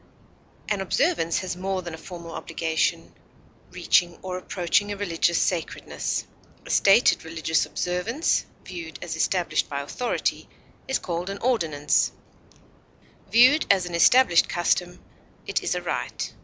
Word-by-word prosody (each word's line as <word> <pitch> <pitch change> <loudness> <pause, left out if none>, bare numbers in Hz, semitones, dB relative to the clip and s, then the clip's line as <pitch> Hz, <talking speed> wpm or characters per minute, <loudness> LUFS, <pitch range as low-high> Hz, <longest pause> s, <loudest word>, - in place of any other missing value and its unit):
An 205 -2 -1
observance 195 - +1
has 185 -1 -4
more 190 0 -3
than 170 -1 -7
a - - -6
formal 170 -1 -9
obligation, 160 -1 -2 0.6
reaching 175 -1 +1
or 185 -1 -4
approaching 185 +2 0
a 205 - -4
religious 170 -3 +1
sacredness; 175 -3 -2 0.4
a - - -6
stated 200 +5 +4
religious 160 0 -1
observance, 195 - -1 0.2
viewed 170 -3 -7
as 160 - -4
established 175 +2 0
by 140 -1 -3
authority, 240 - -2 0.4
is 265 - +1
called 175 +1 -4
an 200 - -4
ordinance; 165 - +1 1.2
viewed 255 +7 +6
as 190 -2 +4
an 175 - -7
established 175 +2 +5
custom, 180 0 -1 0.4
it - - -1
is - - -1
a - - -3
rite. - - -3
180 Hz, 130 wpm, -25 LUFS, 165-200 Hz, 1.2 s, viewed